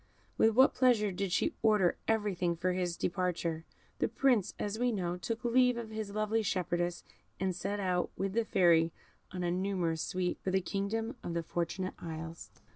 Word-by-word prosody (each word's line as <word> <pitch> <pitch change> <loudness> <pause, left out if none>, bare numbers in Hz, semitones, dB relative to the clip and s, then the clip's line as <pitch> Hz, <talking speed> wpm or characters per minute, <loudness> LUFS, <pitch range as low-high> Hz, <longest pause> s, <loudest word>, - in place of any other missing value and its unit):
With 220 -1 +4
what 260 +2 +6
pleasure 235 -6 +3
did 190 0 -2
she - - +1
order 210 -5 +4
everything 200 -6 +1
for 180 +2 0
his 180 -2 -1
departure. 170 -3 -1 0.3
The - - +2
Prince, 245 -8 +2
as 210 +2 -3
we 245 0 +2
know, 180 -5 -1
took 230 +7 -4
leave 250 0 +4
of 230 -2 -6
his 215 -2 -4
lovely 215 +1 +1
shepherdess, 175 -3 -1 0.4
and 190 -1 0
set 200 +3 -3
out, 180 -2 0
with 195 0 -2
the 230 +1 +2
Fairy 170 -5 +4 0.4
and 180 -1 -3
a 175 - +1
numerous 180 -3 -1
suite, 180 0 -2
for - - -2
the 190 +1 +2
kingdom 220 +6 -2
of 170 - -4
the 170 - -1
Fortunate 175 +3 -2
Isles. 165 0 -7
190 Hz, 180 wpm, -32 LUFS, 175-220 Hz, 0.4 s, what